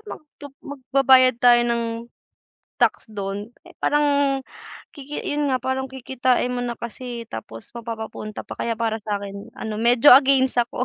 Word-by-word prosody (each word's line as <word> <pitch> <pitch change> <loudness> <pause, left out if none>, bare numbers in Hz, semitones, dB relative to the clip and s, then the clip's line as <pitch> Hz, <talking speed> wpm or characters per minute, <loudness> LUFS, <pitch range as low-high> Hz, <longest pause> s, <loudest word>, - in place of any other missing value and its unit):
mag - - -8 0.2
tu 285 - -8 0.2
magbabayad 260 -2 +3
tayo 240 -1 +6
ng 235 0 0 1.0
tax - - +2
dun 205 +2 -5
eh - - -17
parang 285 -2 +2 0.5
kiki 290 +1 -7
yun 290 0 -1
nga 260 - +2
parang 260 +1 -2
kikitain 255 -1 -1
mo 245 - -2
na 240 -1 -3
kasi 235 0 -7
tapos 115 0 -9
mapapapunta 220 -2 -7
pa - - -9
kaya 230 -1 -1
para 225 -1 -1
sa 210 -1 -2
akin 200 0 -8
ano 220 -1 -5
medyo 240 +4 +6
against 265 -2 +3
ako. 240 +1 -2
245 Hz, 155 wpm, -22 LUFS, 225-265 Hz, 1.0 s, tayo